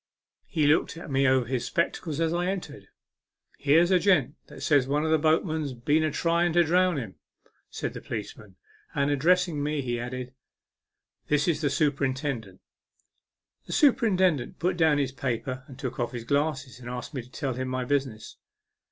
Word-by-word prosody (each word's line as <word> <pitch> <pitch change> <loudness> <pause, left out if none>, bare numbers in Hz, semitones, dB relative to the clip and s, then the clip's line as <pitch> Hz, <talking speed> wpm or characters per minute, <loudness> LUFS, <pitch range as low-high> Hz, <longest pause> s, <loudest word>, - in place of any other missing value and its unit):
He 155 -5 0
looked 155 +2 +2
at 165 - -8
me 135 +1 +3
over 130 -1 +3
his 125 0 -2
spectacles 170 -3 -2
as 165 0 +1
I 175 +1 0
entered. 180 -7 -5 0.4
" - - -38
Here's 165 +5 +4
a 185 - +5
gent 165 -8 +3 0.2
says 145 -4 +3
that - - -5
one 150 +2 +1
of 160 - 0
the 160 - +4
boatmen's 155 -2 +1
been 145 +6 +1
a 155 - +1
trying 170 +3 +1
to 175 0 +5
drown 180 +1 +2
him," 110 - -6 0.5
said - - -4
the - - -7
police 105 -3 -5
man; 105 -4 -16 0.4
and, 140 +1 +1
addressing 170 +2 +2
me, 145 -1 -1
he 120 -1 -2
added, 125 +1 -5 0.5
" - - -53
This 150 +1 +2
is 160 -3 +1
the 145 - +1
superintendent." 135 -7 -1 1.1
The - - -5
superintendent 190 - +3
put 180 +2 0
down 160 -3 +3
his 140 -2 0
paper 130 0 -3
and 130 - -12
took 130 -2 -5
off 120 0 -2
his 120 -2 -5
glasses, 140 -1 -1
and 120 -1 -8
asked 125 +4 -6
me 130 - -3
to 120 - -17
tell 130 0 -3
him 130 +1 -4
my 130 0 -2
business. 130 -5 -2
145 Hz, 185 wpm, -27 LUFS, 130-165 Hz, 1.1 s, a